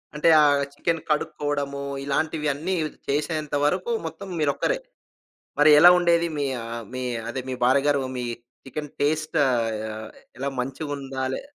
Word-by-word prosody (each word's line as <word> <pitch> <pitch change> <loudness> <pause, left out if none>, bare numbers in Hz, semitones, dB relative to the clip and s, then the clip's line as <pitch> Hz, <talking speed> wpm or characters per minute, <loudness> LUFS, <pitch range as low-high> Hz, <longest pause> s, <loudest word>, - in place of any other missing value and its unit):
అంటే 150 +2 +3
ఆ - - +6 0.3
చికెను 165 +2 -1
కడుక్కోవడము. 145 -2 -1 0.2
ఇలాంటివిన్నీ 150 +3 -1 0.3
చేసేంత 150 +1 -1
వరకు 185 +9 0
మొత్తం 165 +5 -7
మీరొక్కరే. 155 - +1 0.8
మరి 150 +1 +7
ఎలా 175 +4 +10
ఉండేది? 170 -1 +3
మీ 145 - 0 0.2
ఆహ్, 115 0 -5
మీ 130 - -3 0.3
అదే 130 - -3
మీ - - -2
భార్యగారు. 140 +3 +3 0.2
మీ 125 - -2 0.4
చికెను 150 +2 -6
టేస్ట్ 155 +2 0
ఆహ్, 110 -3 -2 0.3
ఎలా 135 +2 -2
మంచిగుందా? 135 0 -4
లే - - -4
145 Hz, 130 wpm, -24 LUFS, 135-155 Hz, 0.8 s, ఎలా